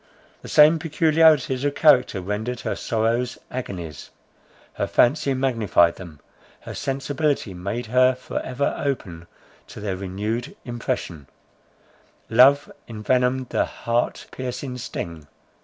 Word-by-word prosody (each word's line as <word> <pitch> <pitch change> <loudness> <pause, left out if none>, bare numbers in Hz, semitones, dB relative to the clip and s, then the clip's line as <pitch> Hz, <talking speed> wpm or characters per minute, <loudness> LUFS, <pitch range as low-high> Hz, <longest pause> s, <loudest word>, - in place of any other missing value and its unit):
The - - -10
same 155 +2 +6
peculiarities 155 -4 +3
of 145 0 0
character 125 -10 +4
rendered 110 +6 -3
her - - -2
sorrows 115 +2 -1
agonies; 90 - -6 0.6
her - - -2
fancy 140 +1 +2
magnified 115 -10 +2
them, 85 -6 -11 0.4
her - - -8
sensibility 140 -4 -2
made 100 +7 -4
her 125 +3 +3
for 125 - -5
ever 130 +2 -2
open 90 -12 -4 0.4
to - - -10
their 100 -2 -3
renewed 100 +5 -4
impression; 90 - -4 1.0
love 135 +5 +5 0.2
envenomed 125 +3 0
the - - +1
heart 120 +1 -2
piercing 125 0 -5
sting. 85 -9 -6
125 Hz, 115 wpm, -23 LUFS, 105-135 Hz, 1.0 s, same